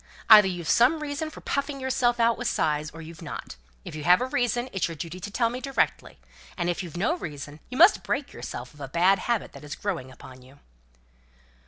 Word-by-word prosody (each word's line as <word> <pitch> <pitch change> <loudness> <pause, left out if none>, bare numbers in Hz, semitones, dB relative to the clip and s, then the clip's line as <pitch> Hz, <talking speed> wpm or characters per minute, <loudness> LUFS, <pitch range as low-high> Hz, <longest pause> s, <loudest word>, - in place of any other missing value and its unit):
either 210 -2 +10
you've 175 -3 -4
some 250 - +4
reason 300 +1 -3
for 310 - -12
puffing 280 0 -2
yourself 250 -2 +1
out 230 0 +4
with - - -3
sighs, 150 -1 0
or 165 +2 -10
you've 160 0 -11
not. - - -7 0.3
If - - -7
you 155 -1 -6
have 180 +3 +6
a 255 - 0
reason, 245 -1 0
it's 190 - 0
your 165 - -7
duty 170 +4 -7
to 185 - -6
tell 230 +3 0
it - - -7
me 250 +1 -5
directly; 270 0 -1 0.4
and 175 -1 0
if 175 - -4
you 180 - -6
haven't 175 +4 -4
a 320 +9 +2
reason, 145 - -7
you 250 - -6
must 355 +6 +7
break 285 0 -3
yourself 125 +2 -7
of 150 - -18
a 135 - -5
bad 180 +7 +3
habit 235 -3 -1
that - - -12
is 145 0 -6
growing 170 -11 -4
upon 130 0 -13
you." 130 +2 -17
190 Hz, 230 wpm, -26 LUFS, 155-250 Hz, 0.4 s, either